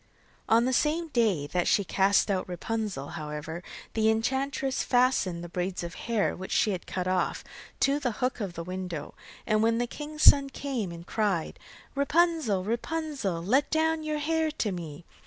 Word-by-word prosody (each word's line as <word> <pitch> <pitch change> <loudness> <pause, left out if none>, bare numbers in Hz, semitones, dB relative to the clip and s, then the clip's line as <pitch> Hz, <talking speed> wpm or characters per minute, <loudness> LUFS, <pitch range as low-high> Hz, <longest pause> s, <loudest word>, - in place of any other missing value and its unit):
On 230 +2 +5
the 260 - +1
same 315 +5 +1
day 215 - +2
that 175 +4 -1
she 200 - +4
cast 195 +2 +3
out 185 -1 -1
Rapunzel, 190 -5 -3
however, 150 +2 -5 0.3
the 220 -1 +3
enchantress 265 +4 0
fastened 245 -9 +2
the - - -6
braids 180 +1 -3
of 170 0 -5
hair, 230 -3 0
which 185 +1 -7
she 215 - +3
had 185 -2 -4
cut 185 -1 -3
off, 185 0 0 0.4
to 280 +1 +3
the 245 -5 -1
hook 255 +2 -1
of 195 -5 -3
the 170 - -5
window, 180 -4 -5 0.3
and 215 0 +2
when 230 +1 +3
the 240 - +1
king's 300 +5 -6
son 275 -1 +7
came 260 -9 -3
and 170 0 -9
cried: 200 -7 -1 0.3
'Rapunzel, 280 - +2
Rapunzel, 235 - -2
Let 265 +10 +2
down 320 0 +1
your 305 -1 -2
hair 320 +1 +1
to 240 -9 -2
me. 165 -3 -7
220 Hz, 175 wpm, -28 LUFS, 180-275 Hz, 0.4 s, son